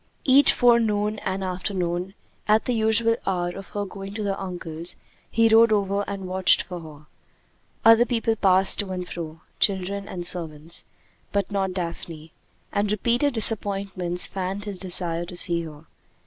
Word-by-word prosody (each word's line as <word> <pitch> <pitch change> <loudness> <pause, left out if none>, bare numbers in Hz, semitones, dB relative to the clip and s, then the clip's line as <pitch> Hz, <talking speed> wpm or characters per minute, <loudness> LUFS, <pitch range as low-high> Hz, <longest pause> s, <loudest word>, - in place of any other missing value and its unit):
Each 275 +1 +6
forenoon 215 -4 +2
and 190 +1 -3
afternoon, 180 0 -3 0.3
at 215 +1 +3
the 250 - 0
usual 225 +1 +3
hour 175 -2 0
of 195 +2 -9
her 205 0 -4
going 195 +1 -9
to 215 - -3
her 195 -1 -2
uncle's, 175 -3 -5 0.3
he 230 0 +3
rode 225 0 +5
over 200 -1 +1
and 195 -2 -5
watched 185 0 +3
for 180 -2 -8
her. 155 -2 -13 0.8
Other 225 +1 +7
people 225 -1 0
passed 190 -2 +4
to 205 -2 -1
and 180 -1 -5
fro, 160 -2 -7 0.2
children 200 0 0
and 175 -2 -6
servants, 165 -2 -3 0.5
but 200 0 -1
not 195 -2 -1
Daphne; 170 -3 -6 0.4
and 205 0 0
repeated 240 +6 0
disappointments 195 -5 +3
fanned 195 +2 -4
his 200 -3 -5
desire 175 -2 -1
to 175 0 -6
see 170 -1 +1
her. 155 0 -12
195 Hz, 155 wpm, -24 LUFS, 175-210 Hz, 0.8 s, Other